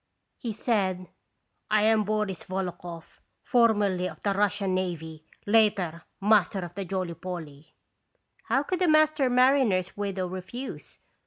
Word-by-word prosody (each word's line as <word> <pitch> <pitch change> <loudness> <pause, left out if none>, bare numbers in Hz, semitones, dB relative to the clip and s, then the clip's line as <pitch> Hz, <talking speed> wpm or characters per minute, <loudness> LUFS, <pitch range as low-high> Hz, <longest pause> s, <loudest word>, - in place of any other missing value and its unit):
He 235 - -3
said: 195 -5 -1 0.6
"I 215 -1 +3
am 215 -1 +3
Boris 210 -3 -2
Volokhoff, 175 -3 -6 0.2
formerly 205 -7 +2
of - - -12
the 200 - +1
Russian 200 -1 0
navy; 160 -4 -4 0.2
later, 200 -6 +2
master 200 -2 +3
of 175 -1 -7
the 195 +1 -5
Jolly 185 -1 -3
Polly." 165 -4 -8 0.7
How 270 - +1
could 365 +4 -3
a 360 - +4
master 310 -3 +4
mariner's 250 -7 +3
widow 195 -2 -2
re 185 +1 -5
fuse? 245 +9 -8
195 Hz, 135 wpm, -27 LUFS, 180-220 Hz, 0.7 s, a